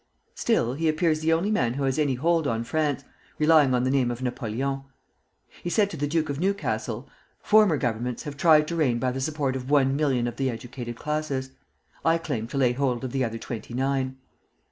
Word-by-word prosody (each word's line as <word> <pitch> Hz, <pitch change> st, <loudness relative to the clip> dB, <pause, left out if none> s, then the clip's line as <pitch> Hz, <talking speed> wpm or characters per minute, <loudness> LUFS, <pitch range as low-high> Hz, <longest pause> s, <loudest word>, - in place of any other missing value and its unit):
Still, 120 Hz, -, +1 dB
he 160 Hz, +3 st, 0 dB
appears 155 Hz, 0 st, +1 dB
the 160 Hz, +1 st, +1 dB
only 170 Hz, +6 st, +2 dB
man 125 Hz, -, +1 dB
who 140 Hz, -, -2 dB
has 135 Hz, +1 st, 0 dB
any 145 Hz, -4 st, +2 dB
hold 165 Hz, +3 st, +1 dB
on 115 Hz, -2 st, -1 dB
France, 150 Hz, +1 st, -1 dB, 0.3 s
relying 150 Hz, -4 st, +5 dB
on 125 Hz, -, +1 dB
the 130 Hz, -, +1 dB
name 135 Hz, -3 st, +2 dB
of 120 Hz, +1 st, -4 dB
Napoleon. 130 Hz, +2 st, -2 dB, 0.8 s
He 175 Hz, -, -3 dB
said 200 Hz, +2 st, +2 dB
to -, -, -5 dB
the 145 Hz, -, -1 dB
Duke 155 Hz, +1 st, 0 dB
of 140 Hz, 0 st, -3 dB
Newcastle: 200 Hz, +3 st, -2 dB, 0.4 s
'Former 210 Hz, -7 st, +5 dB
Governments 120 Hz, -1 st, -2 dB
have 145 Hz, -3 st, -6 dB
tried 155 Hz, 0 st, +5 dB
to 170 Hz, -, -2 dB
reign 135 Hz, -8 st, +2 dB
by 125 Hz, +1 st, 0 dB
the 135 Hz, +1 st, -4 dB
support 145 Hz, -2 st, -1 dB
of 130 Hz, 0 st, -5 dB
one 135 Hz, -2 st, +3 dB
million 135 Hz, -5 st, +1 dB
of 120 Hz, -1 st, -4 dB
the 135 Hz, -1 st, 0 dB
educated 120 Hz, 0 st, -6 dB
classes; 145 Hz, -1 st, -3 dB, 0.5 s
I 165 Hz, 0 st, +4 dB
claim 135 Hz, -9 st, -3 dB
to 140 Hz, -, -5 dB
lay 130 Hz, -3 st, +3 dB
hold 125 Hz, -1 st, -1 dB
of 130 Hz, -, -3 dB
the 135 Hz, 0 st, 0 dB
other 115 Hz, -1 st, -2 dB
twenty 115 Hz, 0 st, -7 dB
nine.' 130 Hz, 0 st, -1 dB
135 Hz, 210 wpm, -26 LUFS, 125-155 Hz, 0.8 s, relying